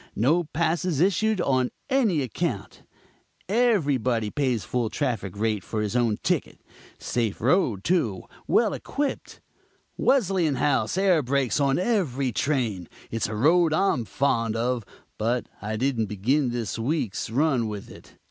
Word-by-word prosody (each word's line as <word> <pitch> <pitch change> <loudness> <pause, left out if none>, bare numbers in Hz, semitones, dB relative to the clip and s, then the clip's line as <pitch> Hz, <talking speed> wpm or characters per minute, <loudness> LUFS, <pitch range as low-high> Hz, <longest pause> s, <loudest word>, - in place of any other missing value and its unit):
No 155 - +2
passes 165 +1 -1
issued 200 +4 +2
on 130 -5 +1 0.2
any 225 - +2
account; 125 - -4 0.7
everybody 140 - +1
pays 130 -7 0
full 120 -3 -1
traffic 110 - -3
rate 105 -2 0
for 110 - -4
his 105 +2 -2
own 115 -4 +2
ticket. - - -1 0.4
Safe 115 -4 -2
road, 120 - +2
too; 120 - 0 0.2
well - - +3
equipped; 285 -1 -4 0.6
Wesleyanhouse 160 - +2
air 190 -4 +4
brakes 135 0 0
on 140 -1 +2
every 165 - 0
train. 115 - -1 0.2
It's 115 0 -1
a 110 - -5
road 160 +7 +4
I'm 155 -8 +1
fond 115 -4 0
of, 120 +1 -1 0.4
but 120 +2 0 0.2
I 110 +1 -3
didn't 120 -3 0
begin 125 +8 +1
this 120 -2 -3
week's 120 -5 -2
run 130 -1 +1
with 105 -2 -7
it." - - -15
130 Hz, 135 wpm, -25 LUFS, 115-165 Hz, 0.7 s, air